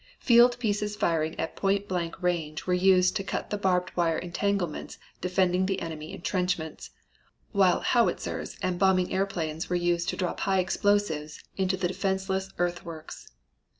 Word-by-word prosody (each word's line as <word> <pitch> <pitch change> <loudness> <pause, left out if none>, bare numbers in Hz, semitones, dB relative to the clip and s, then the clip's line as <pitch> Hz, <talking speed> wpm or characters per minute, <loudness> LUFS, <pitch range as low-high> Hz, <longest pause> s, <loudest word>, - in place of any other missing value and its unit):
Field 240 0 +6
pieces 210 -3 -1
firing 165 -6 0
at - - -3
point 200 +1 0
blank 175 -2 -3
range 160 -3 -1
were 180 - +1
used 185 0 +4
to 195 - -1
cut - - -4
the - - +1
barbed 185 -2 0
wire 165 -2 +2
entanglements 180 -1 -2 0.2
defending 185 0 +2
the 195 -1 -1
enemy 160 -2 -6
intrenchments, 180 -3 -2 0.6
while 195 -4 +3
howitzers 240 -2 0
and 180 -1 -1
bombing 185 -2 +3
airplanes 170 -5 -2
were 180 - 0
used 175 -1 +1
to - - -3
drop 180 -2 -2
high 195 -1 +1
explosives 185 -5 0
into 190 -1 0
the 180 -1 0
defenseless 190 +1 -1
earthworks. 170 -2 -4
185 Hz, 150 wpm, -27 LUFS, 170-195 Hz, 0.6 s, Field